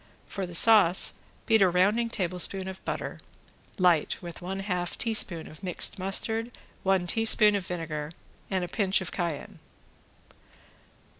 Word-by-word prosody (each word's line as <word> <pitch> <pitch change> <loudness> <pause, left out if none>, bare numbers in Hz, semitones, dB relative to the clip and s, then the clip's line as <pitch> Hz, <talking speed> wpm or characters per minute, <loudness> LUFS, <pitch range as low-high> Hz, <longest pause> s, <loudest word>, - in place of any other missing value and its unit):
For 195 -2 -5
the 175 - -8
sauce 190 -3 +5 0.3
beat 220 -2 +3
a 190 - +5
rounding 205 +7 +2
tablespoon 185 -1 -1
of 190 0 -8
butter - - -5 0.6
light 175 -4 +2
with 175 -2 -10
one 190 +2 -5
half 180 -3 -3
teaspoon 210 -7 +1
of 155 - -13
mixed 185 +1 0
mustard, 220 +5 -2 0.3
one 190 -2 +1
teaspoon 215 +2 +4
of 195 -3 -4
vinegar 160 -3 -5 0.4
and 190 -2 -1
a - - -3
pinch 195 0 0
of 185 - -5
cayenne. 170 -5 -5
185 Hz, 140 wpm, -27 LUFS, 175-205 Hz, 0.6 s, sauce